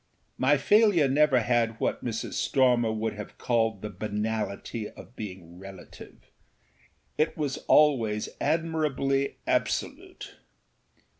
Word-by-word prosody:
My 140 +3 +4
failure 205 -1 +4
never 135 -2 +3
had 115 -1 0
what - - -2
Mrs. 115 -2 -4
Stormer 125 -4 +2
would 110 0 -2
have 105 0 -9
called 115 -4 0
the 105 - -5
banality 105 +2 -4
of 120 - -14
being 90 -5 -9
relativeâit 95 -2 -12 1.2
was 145 -4 -2
always 115 -8 +3
admirably 150 -4 0
absolute. - - -3
120 Hz, 100 wpm, -27 LUFS, 105-140 Hz, 1.2 s, My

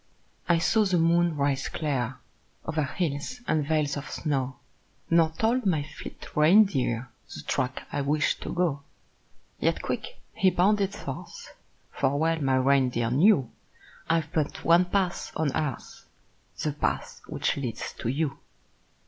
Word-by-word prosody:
I 170 - +5
saw 215 +6 +3
the 190 -3 +2
moon 170 -1 +3
rise 140 -1 0
clear 135 -5 -2 0.5
O'er 160 -2 0
hills 165 - -3
and 155 -1 +2
vales 150 -1 0
of 145 - -6
snow 135 -4 -2 0.6
Nor 165 -1 +5
told 225 +5 +1
my 160 -6 +2
fleet - - -10
reindeer 150 - +4 0.3
The - - -8
track 130 +1 -2
I - - -1
wished 145 +2 +1
to - - -5
go. 170 -6 0 0.8
Yet - - 0
quick - - -4 0.2
he 190 - +4
bounded 200 +2 +2
forth; 140 -10 -8 0.4
For 135 +1 0
well 160 +1 +1
my 135 -2 +2
reindeer 130 -3 +2
knew 140 - +4 0.6
I've 165 -1 +1
but 155 -4 -2
one 170 +2 +6
path 185 -1 -1
on 155 -4 0
earth 150 -6 -4 0.5
The 150 - +1
path 145 - -2
which - - -1
leads 125 -6 -4
to - - -3
you. 140 +1 -1
155 Hz, 140 wpm, -27 LUFS, 135-175 Hz, 0.8 s, one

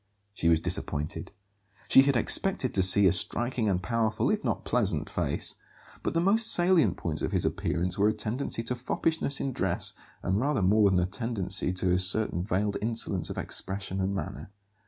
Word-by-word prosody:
She 85 -4 -1
was 80 -1 +3
disappointed. 75 -2 -1 0.6
She 135 - +6
had 140 0 0
expected 135 +1 +3
to 95 - +3
see 95 +2 +8
a 95 - +4
striking 115 +4 0
and 90 -1 -2
powerful, 115 - -1
if 215 0 -3
not - - -3
pleasant 105 -10 -1
face; - - -2 0.4
but - - -4
the - - +2
most 215 +6 +4
salient 175 - +3
points 80 -3 -5
of - - -3
his - - -1
appearance 90 0 -3
were 100 - +3
a - - -1
tendency 115 +2 -4
to 125 +2 -4
foppishness 140 +3 -2
in 135 - -4
dress - - -1 0.3
and 95 +3 -1
rather 135 -4 -1
more 105 +2 +3
than 95 -1 +1
a 90 - 0
tendency 100 -2 -1
to 90 0 0
a 90 - +1
certain 95 -1 +1
veiled 100 +1 -2
insolence 105 -6 -1
of - - -7
expression 95 0 -3
and 95 +1 -2
manner. 95 +2 -7
105 Hz, 185 wpm, -26 LUFS, 90-120 Hz, 0.6 s, see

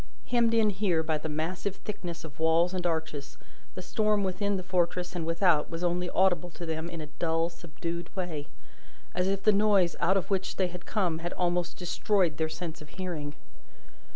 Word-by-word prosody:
Hemmed 235 -2 +3
in 220 -2 +4
here 185 -5 +1
by 155 -1 0
the 160 - -4
massive 175 +6 -2
thickness 175 -5 -6
of 155 -1 -10
walls 165 +3 +4
and 180 -1 0
arches, 160 -4 -3 0.4
the 185 - -5
storm 210 +1 +2
within 195 +2 0
the 185 - -4
fortress 180 0 0
and 165 -2 -2
without 165 -2 +3
was 165 +1 -4
only 175 0 +1
audible 180 -2 +3
to 170 0 -7
them 160 +1 -3
in 170 -2 -5
a - - -4
dull, 165 0 +2
subdued 170 0 -6
way, 165 -6 -3 0.7
as 180 +1 +1
if 195 0 0
the 215 - +7
noise 200 -4 +4
out 190 +3 +4
of 195 - -2
which 190 -1 0
they 185 -2 +1
had 180 0 -9
come 180 -7 +1
had 175 +1 -3
almost 175 -1 0
destroyed 180 -2 +1
their 160 -1 0
sense 165 -1 -5
of 150 - -11
hearing. 160 -6 -4
175 Hz, 190 wpm, -29 LUFS, 165-190 Hz, 0.7 s, the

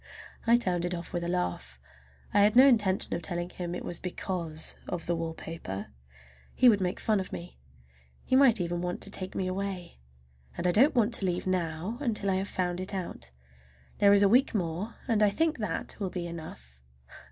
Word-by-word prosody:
I 235 - +6
turned 180 -7 +1
it 175 0 -2
off 170 +3 -8
with 175 -1 -2
a - - -2
laugh. 175 - -3 0.5
I 205 - +4
had 205 +2 +4
no 255 +2 +9
intention 205 -8 +3
of 170 - -2
telling 175 +1 -3
him 175 -1 -5
it - - -6
was 175 - +1
because 175 -3 -3
of 175 -2 -4
the 175 - 0
wallpaper—he 95 - -4
would 210 -4 +5
make 180 0 -1
fun 215 -2 +1
of 190 - -5
me. 175 +1 -8 0.6
He 260 - +1
might 260 -5 +6
even 175 0 -2
want 180 0 -3
to 200 - +1
take 185 -2 -2
me 190 - -1
away. 185 - -4 0.6
I - - -3
don't 215 - +4
want 235 -1 +2
to 200 - +6
leave 175 0 -2
now 180 +4 -2
until 210 -7 -1
I 185 - +1
have 195 +1 -3
found 180 -1 -2
it 185 +2 -4
out. 175 - -6 0.7
There 200 -1 +6
is 200 0 +6
a - - +6
week 245 +4 +3
more, 180 +4 -3
and 225 -4 +1
I 210 - +5
think 315 +6 0
that 210 -6 -3
will 195 -3 -2
be 180 -1 -4
enough. 110 - -9
185 Hz, 195 wpm, -29 LUFS, 170-205 Hz, 0.7 s, no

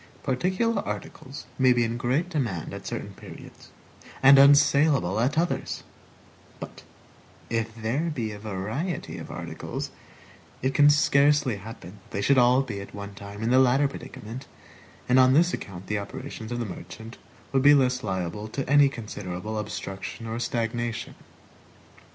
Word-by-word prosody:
Particular 190 - 0
articles 135 +3 -7
may 130 -1 +6
be 120 -1 +2
in 115 0 -1
great 130 +8 0
demand 120 - -3
at - - -7
certain - - -5
periods, - - -13 0.5
and 135 0 +9
unsalable 140 - +5
at 130 +6 +1
others; 170 +2 -1 0.8
but - - -9 0.7
if 115 -1 -1
there 120 +9 -1
be 115 -8 -3
a 105 - -8
variety 110 - -4
of - - -9
articles, - - -6 0.7
it 130 +1 +1
can 145 -1 +6
scarcely 145 -4 +3
happen 100 -2 -10
that - - -25
they 100 - 0
should 140 +2 +4
all 125 +2 +5
be 105 -6 -5
at 100 - -10
one 100 0 -7
time 100 +1 -8
in 115 - +1
the 130 - +6
latter 130 +2 +4
predicament, 130 -2 -9 0.6
and 125 +1 +5
on 130 0 +6
this 175 +5 +4
account 95 -1 -6
the 105 +1 -1
operations 110 +2 -7
of 120 - -2
the 120 - -2
merchant 110 +4 -9 0.3
would 135 - +2
be 145 +2 +7
less 125 -2 +2
liable 95 +1 -3
to 135 +5 -4
any 145 0 +6
considerable 105 -3 -5
obstruction 100 +2 -6
or 115 +1 -4
stagnation. 120 -1 -2
120 Hz, 155 wpm, -26 LUFS, 105-140 Hz, 0.8 s, and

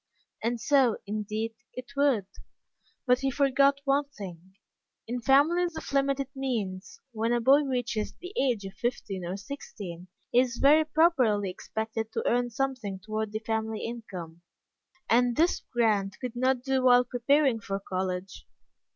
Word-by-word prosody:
And 235 +1 0
so, 265 -3 +3
indeed, 215 +2 -3 0.2
it 255 +1 -8
would. 275 -8 +2 0.8
But 250 -1 +4
he 270 0 0
forgot 275 0 +3
one 280 +1 +2
thing. 190 - -10 0.5
In 245 +1 -3
families 320 +7 +3
of 300 - -7
limited 275 -1 +1
means, 210 -8 -3
when 225 0 -1
a 240 - +2
boy 270 +5 +5
reaches 245 -5 -2
the 360 +3 -10
age 240 -7 +1
of 195 - -7
fifteen 200 -4 -3
or 180 +3 -4
sixteen 195 -6 -8 0.2
he 245 - +5
is 250 -2 +1
very 305 +3 +5
properly 260 - +3
expected 220 +3 -4
to - - -1
earn 245 0 +2
something 240 -5 -2
toward 215 +2 -4
the 215 +1 -4
family 220 -1 -2
income, 185 -8 -7 0.7
and 240 +1 +3
this 335 +6 +2
Grant 210 -5 +1
could 250 -2 -5
not 255 0 +1
do 265 -1 +1
while 250 -1 +6
preparing 250 +1 +2
for 195 -2 -4
college. 185 -1 -4
240 Hz, 150 wpm, -28 LUFS, 210-270 Hz, 0.8 s, while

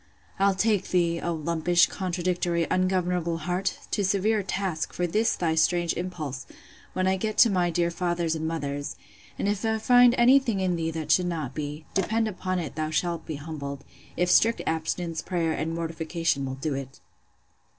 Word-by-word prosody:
—I'll 195 0 +3
take 210 -1 +1
thee, 170 -2 +1
O 170 - -1
lumpish, 170 +2 +2
contradictory, 175 -2 -1
ungovernable 180 -2 +1
heart! 180 +4 -2
to 205 - 0
severe 205 +3 +2
task, 190 -4 -3
for 180 - -1
this 215 +6 +1
thy 165 -2 0
strange 170 +1 +2
impulse, 155 -7 -5 0.5
when 185 - 0
I 190 0 +2
get 215 +3 -3
to 230 - +7
my 180 -2 +2
dear 170 0 0
father's 175 -1 -1
and 160 0 -2
mother's; 145 -3 -3 0.4
and - - -1
if 205 +1 -1
I 220 0 +1
find 245 +2 +6
any 250 +3 +7
thing 230 -7 -2
in 185 -2 +1
thee 165 -1 -1
that 160 -1 -3
should 180 -1 +4
not 155 -7 -3
be, 150 +1 -5
depend 220 +4 +1
upon 185 -2 -3
it 165 -5 -4
thou 155 0 -2
shalt 170 +1 -1
be 160 - -3
humbled, 140 -2 -6 0.3
if 180 0 +2
strict 230 +5 +4
abstinence, 160 +1 -2
prayer, 170 -3 -1
and 160 +1 -2
mortification, 165 -3 -2
will 130 - -4
do 145 +2 -3
it! 135 -1 -6
175 Hz, 180 wpm, -26 LUFS, 160-190 Hz, 0.5 s, to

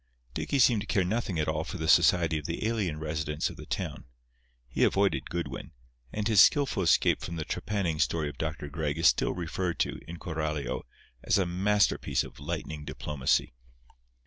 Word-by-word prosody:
Dicky 140 - -1
seemed 120 -4 +5
to 100 - -7
care 100 -4 +2
nothing 100 -1 -1
at 75 -1 0
all 80 0 0
for 90 - -6
the 80 -1 -3
society 80 -1 +4
of 75 - -7
the 85 +5 -3
alien 100 -9 -1
residents 75 -1 -2
of - - -11
the - - -11
town. - - -4 0.6
He - - 0
avoided 100 0 +2
Goodwin, 85 0 -5 0.4
and 105 0 -2
his 110 -4 +6
skilful 140 -8 +4
escape 85 - +3
from 85 - -5
the 80 -2 -3
trepanning 95 -7 -2
story 80 -3 +1
of 75 - -8
Dr. 75 -2 -3
Gregg 75 0 -3
is 80 - -1
still - - +4
referred 90 0 -2
to, - - -1
in 85 +1 -7
Coralio, 80 -3 -3 0.4
as - - +3
a 95 - +2
masterpiece 100 +4 +1
of - - -12
lightning 80 0 -5
diplomacy. 75 -4 -1
85 Hz, 180 wpm, -29 LUFS, 75-100 Hz, 0.6 s, his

